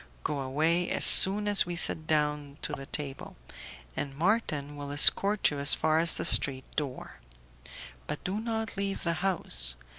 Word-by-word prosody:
Go 145 - -5
away 160 +6 -2
as - - +2
soon 205 +2 +7
as 205 -3 +3
we 175 - -6
sit 160 -2 +3
down 150 -2 -3
to 150 - -3
table, 140 -3 -7 0.6
and 140 -1 -7
Marton 155 -6 -3
will 145 -1 -9
escort 195 +8 +3
you 145 - -7
as 140 0 +4
far 155 0 -1
as 165 0 +3
the - - -3
street 130 -2 +1
door, 130 - -7 0.9
but 150 - -7
do 195 +3 -5
not 225 -2 -6
leave 195 0 -5
the 170 - -2
house. 170 - -2
155 Hz, 160 wpm, -26 LUFS, 145-195 Hz, 0.9 s, soon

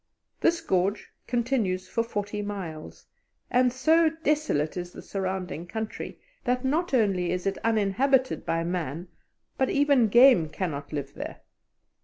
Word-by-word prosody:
This 340 0 +2
gorge 190 +3 0 0.2
continues 230 -7 0
for 230 - 0
forty 205 -2 -3
miles, 185 -7 -7 0.5
and 250 0 +4
so 320 +6 +4
desolate 300 - 0
is 175 -1 -5
the - - -9
surrounding 185 -3 -4
country, 220 +3 -5 0.2
that 250 +1 0
not 325 +7 0
only 195 -7 +2
is 180 0 -2
it 195 0 -1
uninhabited 230 +5 +2
by 165 0 -1
man, 170 -1 -3 0.5
but 265 - +2
even 280 -5 +4
game 235 - +6
cannot 150 -5 -4
live 140 -2 -4
there. - - -7
205 Hz, 135 wpm, -27 LUFS, 180-255 Hz, 0.5 s, game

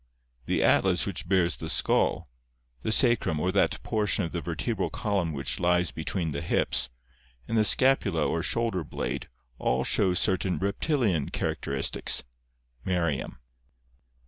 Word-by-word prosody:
The - - +1
atlas - - +3
which - - -5
bears 90 -3 +2
the 80 - -6
skull, - - +1 0.5
the 110 - -2
sacrum 115 - +3
or 90 +4 0
that 100 - +1
portion 105 -2 0
of 80 - -6
the 85 - -3
vertebral 85 +7 -2
column 100 -7 -1
which 70 -2 -2
lies 90 0 +2
between 80 +2 -3
the 70 - -3
hips, - - +1 0.6
and - - -2
the 110 - +4
scapula 105 - +3
or 85 - -1
shoulder 115 -2 -1
blade - - -4 0.3
all 65 +1 +1
show 95 +3 +2
certain 95 -1 +1
reptilian 100 - 0
char - - -1
acteristics 70 0 -1 0.6
(Merriam). 85 -4 -1
90 Hz, 140 wpm, -27 LUFS, 80-105 Hz, 0.6 s, the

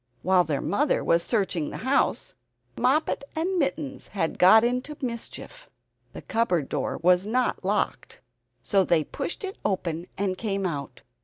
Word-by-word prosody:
While 185 0 +4
their 145 -3 -1
mother 285 +9 +1
was 170 0 +3
searching 190 -6 0
the - - -6
house, 270 +2 +1 0.4
Moppet 280 +3 +1
and 355 +3 0
Mittens 275 -1 -2
had 175 -6 -2
got 220 +5 +7
into 250 +5 -1
mischief. 255 - -6 0.4
The - - -9
cupboard 200 - 0
door - - -2
was 180 +2 +4
not 250 +3 0
locked, - - -2 0.4
so 195 -2 +3
they 170 -3 +2
pushed 275 - -5
it 390 0 -6
open 175 -4 -2
and 190 -2 -1
came 200 -3 -2
out. 140 -7 -4
205 Hz, 150 wpm, -26 LUFS, 180-265 Hz, 0.4 s, got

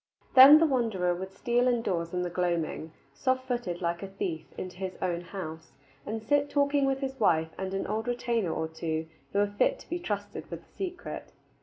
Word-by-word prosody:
Then 270 +3 +11
the 325 - +5
wanderer 225 - +1
would 190 +2 -6
steal 240 +5 +1
indoors 190 -9 0
in 180 0 -1
the 175 - -2
gloaming, 170 -3 -1 0.2
soft 260 -1 0
footed, 220 -9 -2
like 170 0 -1
a 195 - -5
thief, 180 -4 -4
into 185 -1 -6
his 190 -1 -5
own 175 -2 -1
house, 165 -3 -7 0.3
and 220 +1 -3
sit 285 +5 +2
talking 285 -1 +2
with 270 0 0
his 265 -1 -4
wife 160 -6 +3
and 190 0 -4
an 195 - -1
old 220 +3 -2
retainer 235 -6 0
or 160 0 -2
two 160 0 -3 0.3
who - - -2
were 205 - +5
fit - - +3
to - - -16
be 345 - -1
trusted 205 -9 -4
with - - -7
the - - -31
secret. 365 -2 -5
200 Hz, 200 wpm, -29 LUFS, 175-255 Hz, 0.3 s, Then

